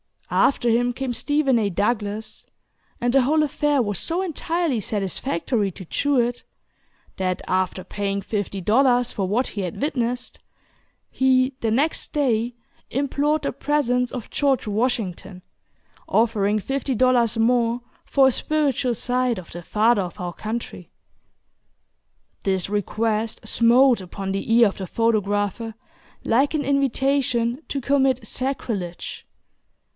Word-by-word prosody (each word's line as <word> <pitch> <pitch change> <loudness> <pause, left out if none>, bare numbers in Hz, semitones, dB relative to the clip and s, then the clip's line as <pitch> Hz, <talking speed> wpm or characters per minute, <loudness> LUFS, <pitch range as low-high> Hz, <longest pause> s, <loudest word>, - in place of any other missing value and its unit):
After 240 -3 +3
him 245 +2 +2
came 260 0 -3
Stephen 280 -1 +1
A. 205 -2 +1
Douglas, 210 +2 -2 0.6
and 245 0 +1
the 270 -1 +5
whole 305 +4 +3
affair 295 -1 +1
was 205 -5 -2
so 345 +2 -1
entirely 335 -5 -1
satisfactory 205 +1 -1
to 185 - -10
Jewett, 245 - 0 0.7
that, 185 -1 -1
after 185 0 0
paying 200 -1 -3
fifty 200 -1 -3
dollars 245 +4 +3
for 195 -2 -2
what 235 +7 +1
he 205 - -5
had 180 +3 -5
witnessed, 250 -3 -2 0.7
he, 260 0 +3
the 225 - 0
next 280 +8 0
day, 240 -5 +1 0.3
implored 285 +3 0
the - - -1
presence 250 -4 0
of 245 -4 -6
George 275 -3 +1
Washington, 205 -4 -2 0.6
offering 215 -2 +2
fifty 270 +4 -2
dollars 240 -2 +3
more 235 +1 +2 0.2
for 270 -1 +4
a - - +4
"spiritual" 275 -3 0
sight 250 0 0
of 180 -3 -9
the 175 - -7
"Father 215 +4 +2
of 180 +2 -6
our 175 -1 -4
Country." 225 +5 -6 1.5
This 190 -1 0
request 215 +2 -1
smote 240 0 +4
upon 190 +1 -5
the 195 +3 -3
ear 230 -1 +6
of - - -10
the 190 - -5
photographer 215 0 0 0.5
like 270 +7 +2
an 295 - 0
invitation 270 -2 +1
to 275 - -3
commit 265 -3 +2
sacrilege. 220 -9 -4
235 Hz, 130 wpm, -23 LUFS, 205-265 Hz, 1.5 s, ear